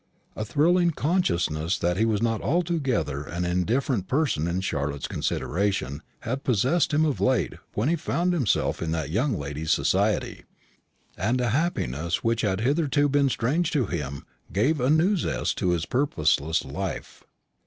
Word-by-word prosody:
A 110 - -3
thrilling 170 - +3
consciousness 90 - 0
that 90 -1 0
he 110 +4 +2
was 110 -1 0
not 115 -2 0
altogether 140 - 0
an 85 +5 -4
indifferent 100 +4 0
person 130 - +1
in 90 +2 -1
Charlotte's 70 -5 -2
consideration 95 -8 -1 0.2
had 130 +4 -3
possessed 130 - +2
him 155 +1 +3
of 145 -4 -1
late 130 -1 +2 0.2
when 110 +6 0
he 170 - +3
found 175 +2 0
himself 80 - 0
in 85 - -2
that 80 -2 -3
young 115 - +1
lady's 75 +2 -5
society, - - +1 0.8
and 115 +7 +1
a 125 -1 +1
happiness 85 - -1
which 115 0 +1
had 100 -2 0
hitherto 145 +2 +2
been 140 0 +3
strange 150 +8 0
to 145 -8 +1
him 70 -7 -4 0.3
gave 135 +9 +1
a 125 - +2
new 165 +7 +4
zest 175 - -1
to 90 - +1
his 85 -2 0
purposeless 80 - +1
life. - - -5
115 Hz, 155 wpm, -25 LUFS, -, 0.8 s, new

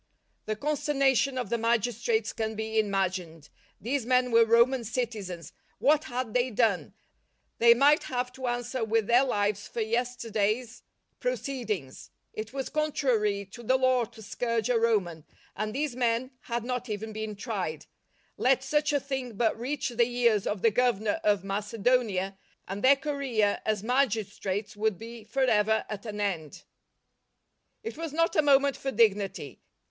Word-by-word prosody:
The 215 - -1
consternation 275 0 +1
of 245 -5 -3
the 235 - +1
magistrates 230 -1 0
can 220 0 -3
be 220 +1 -1
imagined! 185 -6 -2 0.3
These 260 +4 -1
men 250 +1 +2
were 230 0 +6
Roman 235 +3 +4
citi 235 0 -3
zens! 175 -5 -7 0.3
What 295 +6 +3
had 245 -3 -4
they 250 +1 +2
done? 220 -5 0 0.6
They 235 0 +7
might 285 +4 +4
have 250 -1 -2
to 260 -1 -5
answer 245 0 -2
with 225 0 +1
their 240 +4 +5
lives 205 -5 -1
for 235 - -4
yesterday's 230 -1 -1 0.4
SECOND - - -40
JOURNEY - - +1
67 275 - -5 0.4
proceedings. - - -13 0.2
It 215 0 -6
was 270 0 -4
contrary 255 -10 0
to 240 - -10
the 255 +3 +2
law 255 -2 +3
to 225 0 -14
scourge 230 +2 -1
a 235 - +3
Roman, 195 -9 0 0.3
and 215 0 -2
these 280 +1 -2
men 245 +1 0
had 235 -1 -2
not 250 0 -3
even 215 +1 -4
been 215 0 -4
tried. 195 - -4 0.5
Let 260 +1 +3
such 295 +2 +1
a 290 - +2
thing 265 -4 -4
but 225 +1 +1
reach 270 +3 -2
the 240 0 +1
ears 235 -4 +2
of 205 -2 -3
the 230 - +5
Governor 220 -3 +1
of 205 -2 +2
Macedonia, 205 -1 0 0.3
and 195 +2 -5
their 270 +2 +7
career 270 -7 0
as 215 -2 0
magistrates 220 -5 -1
w'ould 210 -2 0
be 230 +1 -9
for 265 +5 0
ever 220 -3 +2
at 210 +1 -6
an 210 -1 -5
end. 175 -7 -3 1.2
It 450 - -6
was 330 -2 -4
not 330 +2 +1
a 310 - +5
moment 280 -1 +4
for 270 - -4
dignity. 200 - +1
230 Hz, 165 wpm, -28 LUFS, 210-255 Hz, 1.2 s, They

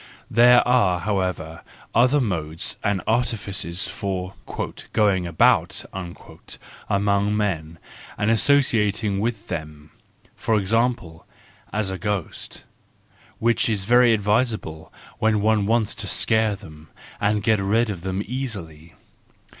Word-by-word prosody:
There 120 +2 +6
are 100 -8 +3
however 90 -5 -2 0.3
other 125 +5 +4
modes 80 - -2
and 100 -3 0
artifices 100 -6 -1
for 95 -3 -4 0.6
"going 100 -5 +2
about" 85 -2 +2
among 100 +3 -3
men 85 -6 -2 0.4
and 105 +2 +1
associ¬ 130 +1 +3
ating 105 -1 -2
with 110 0 -3
them: 75 -3 -7 0.4
for 110 - 0
example, 105 -5 -1 0.4
as 105 -2 -1
a 95 - -5
ghost,—which 105 +3 -4
is 105 -4 0
very 120 +3 +5
advisable 105 -6 -1 0.3
when 110 -2 +2
one 105 -1 +2
wants 115 -1 +1
to - - -5
scare 110 -1 +2
them, 80 -6 -14 0.3
and 105 0 +1
get 110 -1 +3
rid 110 +3 +1
of 90 -4 -7
them 95 +2 -3
easily. 100 - -6
105 Hz, 115 wpm, -23 LUFS, 90-110 Hz, 0.6 s, There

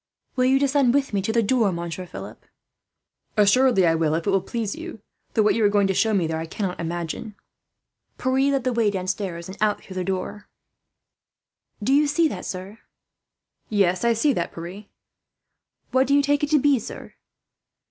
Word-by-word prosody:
"Will 255 -1 +2
you 265 +1 +4
descend 275 -2 +2
with 275 -5 0
me 200 - +1
to 200 - -1
the 230 0 +2
door, 220 -2 +2
Monsieur 170 +1 -5
Philip?" - - -9 0.9
"Assuredly 210 -1 +4
I 165 - +4
will, 160 -1 +1
if 165 - -3
it 200 - +1
will 195 -1 +2
please 215 +1 -3
you; - - -8 0.4
though 220 - +4
what 210 - +4
you 230 - 0
are 205 - +5
going 205 -1 +3
to 195 - +1
show 220 +4 +2
me 195 -5 +2
there, 160 0 -2
I 165 - -5
cannot 185 +1 -4
imagine." 170 +5 -4 0.8
Pierre 265 +2 +1
led 275 -2 0
the 255 0 0
way 230 -3 +2
downstairs 185 -3 -3
and 190 - -8
out 215 -1 +1
through 190 - -10
the 185 - -1
door. 195 +2 -4 1.4
"Do 265 - +2
you 295 +1 +4
see 315 +3 +2
that, - - -6
sir?" 190 +4 -7 0.9
"Yes, 190 -3 +2
I 235 0 +4
see 275 +6 +2
that, 170 -5 -2
Pierre." 180 +5 -8 1.1
"What 260 +1 +3
do 280 - +3
you 285 - +4
take 290 +1 +1
it 295 - +1
to 305 - +4
be, 280 -1 +3
sir?" - - -9
210 Hz, 195 wpm, -23 LUFS, 185-260 Hz, 1.4 s, are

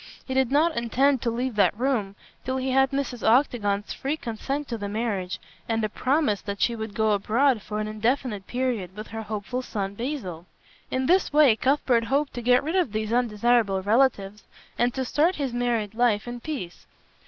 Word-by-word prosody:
He 260 - -4
did 265 -2 +2
not 315 +3 +3
intend 255 +3 +2
to 240 - 0
leave 245 +1 -2
that 205 0 +3
room 230 -6 -1 0.3
till 260 +1 -2
he 260 0 -1
had 270 +1 +4
Mrs. 275 -4 -3
Octagon's 220 -4 +2
free 285 +3 -3
consent 270 +4 -4
to 235 - -3
the 205 0 -4
marriage 205 -4 -2 0.3
and 225 -1 0
a 215 - 0
promise 255 -2 +1
that 200 -1 -5
she 235 - +2
would 220 -2 -6
go 220 -1 +2
abroad 225 +4 +2
for 210 +1 -5
an 215 - -2
indefinite 215 -1 -1
period 240 -8 -2
with 215 - -7
her 225 0 -5
hopeful 215 +3 -4
son, 200 -5 -4
Basil. 200 - -5 0.4
In 260 0 -1
this 370 +6 +3
way 295 -6 +6
Cuthbert 255 -2 +2
hoped 280 +3 0
to 245 - -5
get 245 +2 +4
rid 320 +5 -2
of 350 - +1
these 215 +1 -2
undesirable 230 -4 +2
relatives 210 -2 +1 0.3
and 240 +1 +2
to 260 -1 -1
start 320 +8 +2
his 275 -5 -3
married 235 -4 -1
life 225 -2 +1
in 240 0 -5
peace. 235 - -6
240 Hz, 190 wpm, -25 LUFS, 210-265 Hz, 0.4 s, way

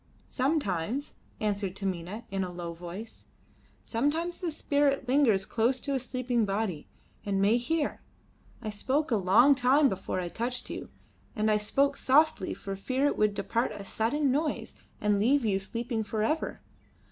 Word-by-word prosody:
"Sometimes," 260 - -1 0.3
answered 200 -3 -1
Taminah 190 +2 -4
in 195 -1 0
a 180 - -4
low 175 -1 -5
voice; 180 +6 -9 0.6
"sometimes 315 +9 -1
the 355 - -2
spirit 285 -3 +1
lingers 245 -8 +3
close 240 +3 +1
to 280 - -3
a 270 - +1
sleeping 250 -2 -1
body 195 -5 -2 0.4
and 200 -1 0
may 205 +4 +4
hear. 295 +5 -1 0.6
I 215 - -3
spoke 265 +8 -1
a - - +4
long 205 +8 +6
time 270 +2 +4
before 190 -1 -3
I 180 - -2
touched 245 +7 -3
you, - - -6 0.5
and 215 0 +2
I 210 - +4
spoke 275 +7 +1
softly 300 +4 +3
for 195 0 -5
fear 255 +8 -1
it 290 - +2
would 210 -1 +2
depart 230 +4 -1
at - - -7
a - - -9
sudden 260 +8 0
noise 295 +3 -1 0.3
and 210 -1 +2
leave 255 +4 +3
you 195 -3 +2
sleeping 230 +3 -3
for 215 +1 -2
ever. 310 +8 -1
230 Hz, 165 wpm, -29 LUFS, 200-275 Hz, 0.6 s, long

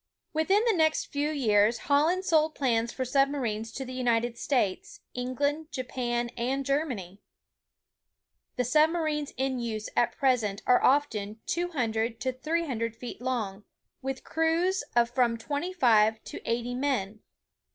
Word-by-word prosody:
Within 380 +7 +3
the 460 - +4
next 315 -2 +1
few 290 +1 0
years 225 -6 +3
Holland 315 +9 +2
sold 315 -2 +3
plans 235 -4 +1
for 260 - -3
sub 275 +2 +3
marines 225 -6 -3
to 265 - -5
the 255 - -7
United 240 -2 +1
States, 235 -8 -1
England, 285 +6 -2
Japan, 240 -2 -2
and 265 +3 -1
Ger 280 +4 +1
many. 195 - -7 1.3
The 250 - +1
submarines 310 +1 +2
in 265 -1 -1
use 220 -3 -4
at 240 - +1
present 230 -7 +1
are 250 - +5
often 220 -7 +1
200 235 -10 -1
to 260 -1 -1
300 255 -6 -2
feet 245 +1 -8
long, 220 -6 -2 0.4
with 270 0 -4
crews 330 +4 +1
of 240 0 +3
from 240 -2 +2
twenty 290 +9 -3
five 220 -9 +3
to - - -8
eighty 240 +1 -1
men. 245 -6 -1
255 Hz, 140 wpm, -28 LUFS, 230-295 Hz, 1.3 s, are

